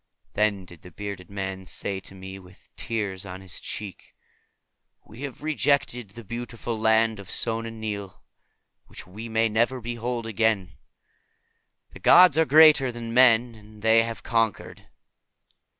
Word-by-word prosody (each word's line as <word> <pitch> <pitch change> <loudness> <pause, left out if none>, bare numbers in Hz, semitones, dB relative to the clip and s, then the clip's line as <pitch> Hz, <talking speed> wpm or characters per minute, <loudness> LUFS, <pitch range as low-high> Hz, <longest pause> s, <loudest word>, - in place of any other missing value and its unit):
Then 105 -3 0
did 85 -2 -15
the 90 - -12
bearded 100 0 -8
man 95 -1 -5
say 100 -1 -3
to 95 - -13
me, 95 +1 -9
with 90 0 -20
tears 100 -5 -3
on 95 -1 -8
his 95 -1 -7
cheek, 105 -3 -7 0.9
"We 115 +5 -13
have 140 0 -7
rejected 140 -7 0
the 115 - -9
beautiful 115 +1 -5
Land 110 0 +2
of 100 -2 -11
Sona 115 0 -1
Nyl, 105 -4 -6 0.7
which - - -11
we 110 +6 -9
may 110 0 +2
never 115 +4 0
behold 120 0 -4
again. 110 -4 0 1.2
The - - -12
gods 180 -5 +7
are 160 - +4
greater 150 -4 +6
than 115 -1 -7
men, 120 -1 +5
and 105 -1 -16
they 110 0 +5
have 115 0 -5
conquered." 115 -3 -2
110 Hz, 145 wpm, -25 LUFS, 100-120 Hz, 1.2 s, gods